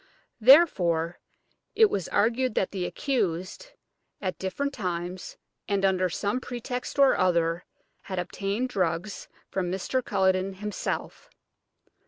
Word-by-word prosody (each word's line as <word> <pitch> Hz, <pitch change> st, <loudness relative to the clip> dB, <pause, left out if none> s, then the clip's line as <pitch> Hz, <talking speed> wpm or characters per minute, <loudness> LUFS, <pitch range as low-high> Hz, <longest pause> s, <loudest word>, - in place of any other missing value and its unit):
Therefore 180 Hz, -, +5 dB, 0.6 s
it 445 Hz, -, +7 dB
was 190 Hz, -, -2 dB
argued 235 Hz, +3 st, +1 dB
that 190 Hz, -, +1 dB
the 185 Hz, -3 st, -2 dB
accused, 190 Hz, -, -2 dB, 0.5 s
at 185 Hz, -2 st, -3 dB
different 280 Hz, +10 st, -2 dB
times 180 Hz, -4 st, -4 dB, 0.3 s
and 200 Hz, -1 st, +1 dB
under 185 Hz, -1 st, +2 dB
some 205 Hz, +8 st, -1 dB
pretext 250 Hz, +1 st, -5 dB
or 275 Hz, -1 st, +6 dB
other, 170 Hz, -2 st, +1 dB, 0.4 s
had 185 Hz, -, -3 dB
obtained 200 Hz, +7 st, -2 dB
drugs 185 Hz, -1 st, -2 dB, 0.2 s
from 180 Hz, -2 st, -1 dB
Mr. 220 Hz, +7 st, -1 dB
Culledon 190 Hz, -1 st, +1 dB
himself. 210 Hz, +2 st, -4 dB
195 Hz, 115 wpm, -27 LUFS, 180-245 Hz, 0.6 s, it